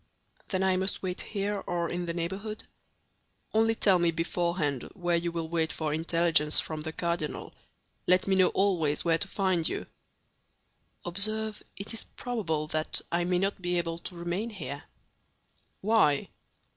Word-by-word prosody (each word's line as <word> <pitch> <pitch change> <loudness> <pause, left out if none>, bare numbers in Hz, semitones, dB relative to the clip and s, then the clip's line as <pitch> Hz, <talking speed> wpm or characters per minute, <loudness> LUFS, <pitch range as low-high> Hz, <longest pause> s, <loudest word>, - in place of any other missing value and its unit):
"Then 190 -1 +1
I 190 -1 +3
must 190 +1 0
wait 185 -1 -2
here, 205 -1 -2
or 170 -1 0
in 175 0 -3
the 170 - -1
neighborhood?" 195 +6 -3 0.9
"Only 225 +1 +4
tell 195 -5 +4
me 170 -1 +3
beforehand 165 -4 -1
where 175 -3 +1
you 170 0 0
will 165 -1 -3
wait 160 -1 0
for 155 -2 -2
intelligence 165 -1 +3
from 155 -1 -3
the 160 +1 -3
cardinal; 170 -2 -2 0.5
let 185 +1 +5
me 195 - +3
know 185 -1 +6
always 175 -7 +1
where 165 -1 +3
to 200 - 0
find 185 -4 +1
you." - - -3 1.2
"Observe, 215 +4 +1 0.2
it 205 +3 -4
is 225 - -3
probable 185 -11 -2
that 155 0 0
I 175 +1 +1
may 180 0 +2
not 195 +1 0
be 175 0 0
able 165 -1 -1
to 175 - -7
remain 175 +6 -2
here." 145 - -6 1.0
"Why?" 195 -9 +3
175 Hz, 160 wpm, -29 LUFS, 165-195 Hz, 1.2 s, know